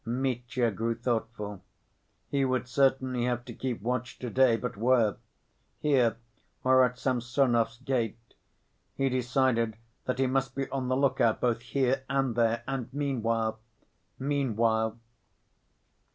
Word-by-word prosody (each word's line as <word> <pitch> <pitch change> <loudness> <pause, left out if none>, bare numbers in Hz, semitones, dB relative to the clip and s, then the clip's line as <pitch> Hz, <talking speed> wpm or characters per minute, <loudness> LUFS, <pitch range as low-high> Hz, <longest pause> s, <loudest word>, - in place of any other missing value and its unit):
Mitya 125 -1 -1
grew 115 +3 -1
thoughtful. 110 -4 -3 0.7
He 140 -1 0
would 130 -1 0
certainly 130 -1 +2
have 120 -1 -1
to 120 - -8
keep 120 -3 -4
watch 125 +1 -2
to‐day, 125 -1 +3
but 125 -1 -4
where? 115 -1 +3 0.6
Here 125 -7 +2 0.5
or 130 0 +6
at 125 0 0
Samsonov's 120 -2 +1
gate? 125 -4 -1 0.8
He 135 0 +1
decided 125 -3 +1 0.3
that 125 - -1
he 135 - +2
must 135 +1 0
be 135 0 -2
on 135 -2 -2
the 130 0 +1
look 135 -1 +2
out 115 -2 +3
both 120 -2 +1
here 130 +1 0
and 135 -3 +1
there, 115 0 +1
and 130 -2 -3
meanwhile... 115 -6 -1 0.6
meanwhile.... 115 -5 +1
125 Hz, 130 wpm, -29 LUFS, 115-130 Hz, 0.8 s, or